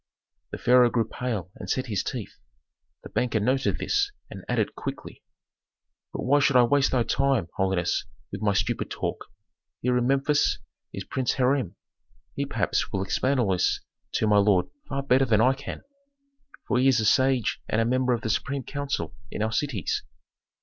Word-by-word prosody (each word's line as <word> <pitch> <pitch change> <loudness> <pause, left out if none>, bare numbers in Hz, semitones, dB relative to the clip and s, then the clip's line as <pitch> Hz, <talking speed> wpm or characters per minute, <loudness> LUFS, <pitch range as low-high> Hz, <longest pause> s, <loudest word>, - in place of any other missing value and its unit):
The - - -6
pharaoh 125 0 +5
grew 115 -2 0
pale 110 -10 -4
and - - -8
set 130 - 0
his 105 -6 -1
teeth. - - -6 0.6
The - - -9
banker 120 -3 0
noted 130 +6 +1
this 410 -1 0 0.2
and - - -8
added, - - 0
quickly, - - -7 0.9
"But - - -5
why 145 +3 +4
should 140 -1 +2
I 125 - +7
waste 140 +3 +3
thy 125 -2 +2
time, 135 -9 +1
holiness, 95 -3 0 0.3
with 100 - -6
my 105 -2 +2
stupid 100 - -1
talk? - - -4 0.5
Here 125 0 +1
in 125 0 +1
Memphis 140 +2 +2 0.3
is - - -6
Prince 130 -2 -1
Hiram; 130 -6 +1 0.6
he - - -2
perhaps - - -1
will 95 - -1
explain 130 +7 0
all 115 -6 +2
this 90 -1 +1 0.3
to - - +1
my 105 -1 +4
lord 100 -3 +3 0.2
far 140 0 -2
better 135 0 +3
than 110 -4 +3
I 130 +4 +5
can, 135 +1 -7 0.8
for 125 - +2
he 130 - +4
is 130 -3 +4
a 110 - 0
sage 130 +1 +2
and 110 - +1
a 115 - +2
member 125 +1 +2
of 115 - -1
the 110 - -1
supreme 140 +4 -2
council 140 -1 -3 0.2
in - - -3
our 110 - -1
cities." 115 - -1
125 Hz, 180 wpm, -26 LUFS, 110-135 Hz, 0.9 s, I